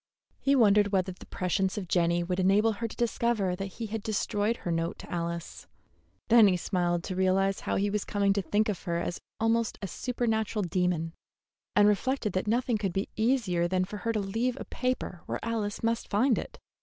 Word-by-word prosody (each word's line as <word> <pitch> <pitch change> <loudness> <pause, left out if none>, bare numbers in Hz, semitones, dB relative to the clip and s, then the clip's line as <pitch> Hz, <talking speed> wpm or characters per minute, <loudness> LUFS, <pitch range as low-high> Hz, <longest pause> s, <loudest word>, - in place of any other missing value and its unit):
He 275 0 +3
wondered 205 -4 +5
whether 190 -1 +1
the 180 - -13
prescience 190 +1 -1
of 195 -3 -4
Jenny 170 0 +2
would 180 +1 -2
enable 200 +4 +4
her 230 +2 -3
to - - -10
discover 230 -5 0
that 195 0 -6
he 230 - -3
had 220 0 -4
destroyed 210 +1 0
her 175 - -4
note 165 0 -1
to - - -11
Alice; 170 -1 -4 0.6
then 230 -2 +7
he 185 -2 +2
smiled 175 -2 0
to 185 - -4
realize 190 +1 +2
how - - -2
he 200 +1 +1
was 210 0 -1
coming 200 -1 +1
to 200 - 0
think 205 +5 +1
of 205 -4 -2
her 170 -2 0
as 175 +1 -3 0.2
almost 225 0 +1
a 200 - -4
supernatural 220 -1 -1
demon, 175 -2 0 0.6
and 205 0 +6
reflected 210 +1 +1
that 185 +2 -1
nothing 235 0 +1
could 195 -4 -1
be 195 +2 -2
easier 220 -7 +1
than 185 +1 +1
for 210 +2 -7
her 230 +2 -1
to 220 - 0
leave 225 +5 -1
a - - -6
paper 250 -8 -3
where - - -2
Alice 220 -3 -2
must 230 0 0
find 235 +4 +3
it. - - -8
200 Hz, 205 wpm, -29 LUFS, 185-225 Hz, 0.6 s, then